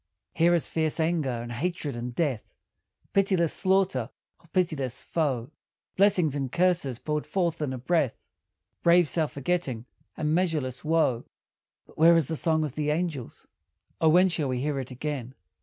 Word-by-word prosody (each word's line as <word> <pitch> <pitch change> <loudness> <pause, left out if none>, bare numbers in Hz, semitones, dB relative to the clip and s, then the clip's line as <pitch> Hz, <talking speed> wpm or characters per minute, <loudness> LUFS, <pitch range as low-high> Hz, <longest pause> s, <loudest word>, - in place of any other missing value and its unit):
Here 170 +1 +4
is 170 - 0
fierce 160 0 -1
anger 160 -3 +1
and 120 -1 -4
hatred 150 +1 -3
and 120 0 -5
death, 140 -10 -2 0.6
Pitiless 190 -4 +2
slaughter 185 - +1 0.3
of 165 - -25
pitiless 155 -9 -1
foe; 140 -6 -2 0.4
Blessings 185 -6 +3
and 135 -3 -3
curses 175 -8 +1
poured 150 +3 -3
forth 170 -4 -1
in 145 -3 -1
a 130 - -4
breath; 135 0 0 0.6
Brave 170 0 +5
self 155 0 0
forgetting, 140 -5 -2 0.3
and 155 0 0
measureless 155 -8 -1
woe. 155 -7 +1 0.6
But - - -18
where 165 +1 +7
is 165 -5 +2
the 160 - -1
song 160 0 +1
of 150 -4 -3
the 150 0 -1
angels? 155 -5 -3 0.6
O 160 - +5
when 180 +4 +6
shall 160 -5 -1
we 125 -1 -1
hear 145 0 -1
it 130 - -5
again? 130 -1 -5
155 Hz, 160 wpm, -27 LUFS, 130-170 Hz, 0.6 s, where